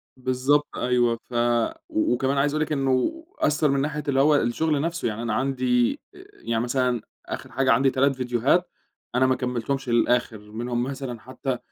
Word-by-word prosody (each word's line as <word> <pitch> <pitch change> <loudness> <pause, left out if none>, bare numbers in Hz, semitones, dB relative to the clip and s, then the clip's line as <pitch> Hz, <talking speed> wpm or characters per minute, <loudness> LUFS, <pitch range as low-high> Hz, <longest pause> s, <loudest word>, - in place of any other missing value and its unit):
بالضبط 130 +3 +1
أيوَه 120 -2 +2
فَ - - -12 0.6
وكمان 310 - +1
عايز 145 +1 +2
أقول 155 - 0
لِك - - -11
إنّه 140 - 0 0.2
أثر 150 0 +2
مِن 140 0 +1
ناحية 150 +1 -2
اللي 135 -1 +2
هو 150 +2 +5
الشغل 145 +3 +1
نفسه، 170 -3 -2
يعني 110 0 -3
أنا 115 -2 -2
عندي، 130 - +1 0.2
آآ، 370 +1 -13
يعني 115 - -2
مثلًا 125 -1 0 0.2
آخر - - -6
حاجة 135 0 +2
عندي 135 0 +4
3 135 +1 +1
ڤيديوهات 125 +7 +2 0.5
أنا 130 +1 +4
ما 130 - +3
كملتهمش 125 +2 -2
للآخر، 120 -3 +1
منهم 120 +2 -2
مثلًا 130 -2 -5
حتّى 130 +1 -4
130 Hz, 170 wpm, -24 LUFS, 120-145 Hz, 0.6 s, هو